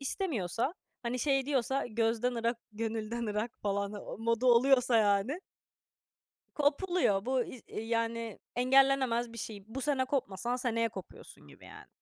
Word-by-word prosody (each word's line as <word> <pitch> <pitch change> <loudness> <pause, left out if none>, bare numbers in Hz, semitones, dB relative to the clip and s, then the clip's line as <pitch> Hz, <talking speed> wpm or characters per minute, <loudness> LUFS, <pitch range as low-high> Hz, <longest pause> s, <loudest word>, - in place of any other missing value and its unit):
İstemiyorsa, 270 - -1 0.3
hani 245 +1 -2
şey 270 0 +1
diyorsa 270 -1 0
gözden 230 +1 0 0.2
gönülden 225 +1 -3
ırak 210 +3 -1
falan 200 0 -1
o 205 - -7
modu 230 +2 +1
oluyorsa 250 0 +5
yani 210 - +2 1.1
kopuluyor. 290 - +2
Bu 260 -1 +2
i 250 - -10
eee, 215 - -5
yani, 230 -1 -2 0.2
engellenemez 255 -2 +3
bir 230 - -9
şey. 205 -2 -6
Bu 255 +5 -6
sene 275 -2 +1
kopmasan 245 -2 -1
seneye 230 -2 0
kopuyorsun 190 - -11
gibi 70 - -16
yani. - - -12
235 Hz, 135 wpm, -31 LUFS, 220-265 Hz, 1.1 s, oluyorsa